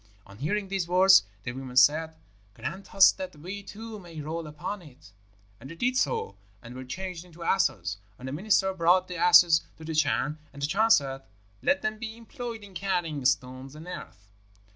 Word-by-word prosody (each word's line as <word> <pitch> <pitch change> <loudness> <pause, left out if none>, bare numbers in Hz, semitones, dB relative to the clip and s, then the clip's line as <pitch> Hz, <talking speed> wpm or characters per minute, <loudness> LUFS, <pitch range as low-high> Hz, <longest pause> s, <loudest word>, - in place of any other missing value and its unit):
On 100 +2 -15
hearing 195 +8 -1
these 190 -3 -1
words, 185 - +6 0.2
the 120 - -3
women 130 0 -7
said, 155 +5 +4 0.4
'Grant 195 +2 -7
us 195 0 +8
that 185 -4 -7
we 185 +7 -7
too 215 +2 -9
may 170 -4 -10
roll 160 +2 -4
upon 150 +7 -5
it.' 145 -7 -16 0.5
And 130 - -11
they 165 - -8
did 250 +7 0
so, 100 - -1 0.3
and 115 - -10
were 130 +1 -7
changed 180 +5 -6
into 170 -1 -12
asses. 190 - +1 0.2
And 130 - -8
the - - -4
minister 190 +4 +2
brought 180 +1 +3
the 180 - -6
asses 175 -2 +7 0.2
to 160 - -11
the 160 - -4
Chan, 150 0 +1
and 140 - -12
the 140 - 0
Chan 215 +9 +2
said, 135 -9 +3 0.4
'Let 285 - +1
them 215 0 -2
be 225 -1 -6
employed 230 -1 -7
in 200 -2 -13
carrying 175 -7 -2
stones 130 +1 -1
and 160 +3 -11
earth.' 100 - -9
170 Hz, 190 wpm, -27 LUFS, 145-195 Hz, 0.5 s, us